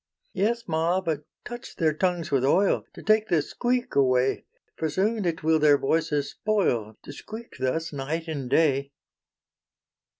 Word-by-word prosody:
"Yes, 225 +4 0
ma, 165 +3 +1
but 155 -5 -3 0.2
touch 240 0 -8
their 160 -4 +2
tongues 175 0 -1
with 135 -2 +2
oil, 190 +9 +3
To - - -10
take 215 +1 +3
the 170 - +3
squeak 245 - -1
away; 130 -1 +2 0.3
For 160 - -2
soon 205 +6 0
it 165 -2 -2
will 160 0 +3
their 150 -1 +5
voices 150 -1 0
spoil, 120 - 0
To 145 - -9
squeak 220 +7 -10
thus 150 +6 -1
night 150 +4 -3
and 140 -6 -4
day." 140 -1 +2
160 Hz, 155 wpm, -26 LUFS, 140-195 Hz, 0.3 s, their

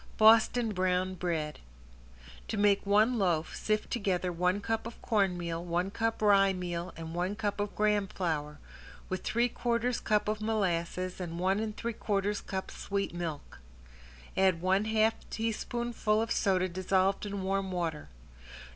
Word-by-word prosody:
~BOSTON 225 +1 +5
BROWN 185 0 +1
BREAD~ 165 -4 -2 0.9
To 220 - -3
make 205 -1 +3
one 215 +4 +4
loaf 170 -5 0
sift 215 0 -1
together 185 -6 0
one 180 +3 +1
cup 225 +2 -2
of 230 - -10
cornmeal, 175 -5 0
one 175 +2 -1
cup 225 0 -1
rye 195 -2 +5
meal, 175 -1 -4
and 165 0 -6
one 180 +4 -1
cup 205 -1 -2
of 205 0 -2
graham 210 -1 +2
flour, 150 -6 -3 0.5
with 185 - -2
three 235 +2 +2
quarters 240 0 -1
cup 210 -1 +1
of 215 0 -1
molasses 185 -4 -1
and 170 -2 -5
one 190 +3 +1
and 220 -1 -3
three 235 0 -3
quarters 205 -1 -1
cup 190 -1 -5
sweet 200 -2 -3
milk. 165 -4 -5 0.8
Add 190 -3 +3
one 190 +4 +2
half 220 0 +3 0.2
teaspoonful 225 0 -1
of 225 0 -1
soda 185 -3 +2
dissolved 185 +2 +1
in 200 -1 -4
warm 195 0 -1
water. 165 -4 -3
195 Hz, 150 wpm, -30 LUFS, 180-215 Hz, 0.9 s, ~BOSTON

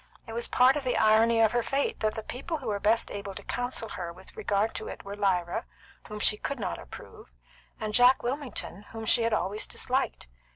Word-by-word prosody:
It 225 - -8
was 235 +1 -2
part 255 +2 +5
of 295 - -2
the 255 - 0
irony 225 +1 +5
of 220 - +5
her 240 - +2
fate 275 +4 -1
that 215 -1 0
the 220 - -4
people 295 +9 -4
who 260 -6 -5
were 205 -1 -1
best 220 +3 +2
able 200 -1 -6
to - - -8
counsel 245 -1 -2
with - - -9
her 175 -2 -4
in 170 - -10 0.2
regard 210 +1 0
to 220 - -5
it - - -7
were 200 - -6
Lyra, 185 -4 0 0.4
whom 210 - -6
she 210 0 +3
could 280 +4 -4
not 190 -4 -3
approve, - - -12 0.5
and 215 -1 -3
Jack 250 +3 +6
Wilmington, 250 - -3
whom 225 0 -5
she 230 - +4
had 230 0 +1
always 210 0 -1
disliked. - - -1
220 Hz, 220 wpm, -28 LUFS, 205-245 Hz, 0.5 s, Jack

